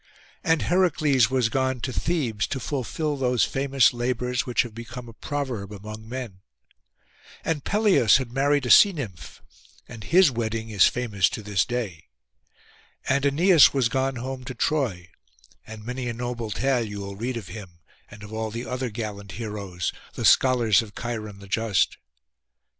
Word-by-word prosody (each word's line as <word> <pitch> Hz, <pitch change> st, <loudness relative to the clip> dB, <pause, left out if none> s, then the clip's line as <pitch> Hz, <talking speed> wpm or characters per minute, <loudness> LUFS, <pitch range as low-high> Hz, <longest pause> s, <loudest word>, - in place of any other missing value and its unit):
And 160 Hz, -2 st, +2 dB
Heracles 155 Hz, -, +3 dB
was 125 Hz, -3 st, +1 dB
gone 130 Hz, +1 st, 0 dB
to 130 Hz, -, -3 dB
Thebes 125 Hz, -9 st, -1 dB
to 135 Hz, -, -3 dB
fulfil 145 Hz, +3 st, -2 dB
those 125 Hz, -3 st, +2 dB
famous 135 Hz, -3 st, +2 dB
labours 125 Hz, +1 st, -1 dB
which 125 Hz, -, +2 dB
have 120 Hz, -3 st, -9 dB
become 120 Hz, +2 st, -8 dB
a 115 Hz, -, -11 dB
proverb 125 Hz, -6 st, -4 dB
among 110 Hz, +2 st, -9 dB
men. 120 Hz, -7 st, -6 dB, 1.1 s
And 155 Hz, -3 st, -1 dB
Peleus 205 Hz, -, +4 dB
had 130 Hz, -3 st, -5 dB
married 140 Hz, +1 st, +1 dB
a -, -, +1 dB
sea 200 Hz, -2 st, +8 dB
nymph, 105 Hz, -, -8 dB, 0.4 s
and 115 Hz, -3 st, -10 dB
his 180 Hz, -3 st, +5 dB
wedding 115 Hz, -1 st, -3 dB
is 100 Hz, -4 st, +5 dB
famous 105 Hz, -7 st, +1 dB
to 110 Hz, -, -6 dB
this 100 Hz, -4 st, +1 dB
day. 105 Hz, -10 st, -4 dB, 1.0 s
And 140 Hz, +1 st, +2 dB
Æneas 160 Hz, +2 st, +5 dB
was 130 Hz, -4 st, +2 dB
gone 135 Hz, +1 st, 0 dB
home 130 Hz, +1 st, -5 dB
to 130 Hz, -, -6 dB
Troy, 115 Hz, -, -1 dB, 0.6 s
and 110 Hz, -1 st, -10 dB
many 125 Hz, +1 st, -4 dB
a 120 Hz, -, -2 dB
noble 120 Hz, -1 st, -4 dB
tale 125 Hz, +3 st, +1 dB
you 105 Hz, -2 st, -6 dB
will 100 Hz, 0 st, -6 dB
read 120 Hz, +4 st, -3 dB
of 105 Hz, -6 st, -8 dB
him, 95 Hz, -6 st, -10 dB, 0.3 s
and 105 Hz, 0 st, -12 dB
of 105 Hz, +1 st, -10 dB
all 110 Hz, 0 st, -2 dB
the 115 Hz, +3 st, -5 dB
other 125 Hz, +1 st, -3 dB
gallant 105 Hz, -3 st, -6 dB
heroes, 100 Hz, -6 st, -4 dB, 0.2 s
the -, -, -3 dB
scholars 120 Hz, -6 st, +5 dB
of 105 Hz, -3 st, -11 dB
Cheiron 110 Hz, -4 st, -5 dB
the 100 Hz, 0 st, -13 dB
just. 110 Hz, -1 st, +1 dB
120 Hz, 165 wpm, -25 LUFS, 105-135 Hz, 1.1 s, sea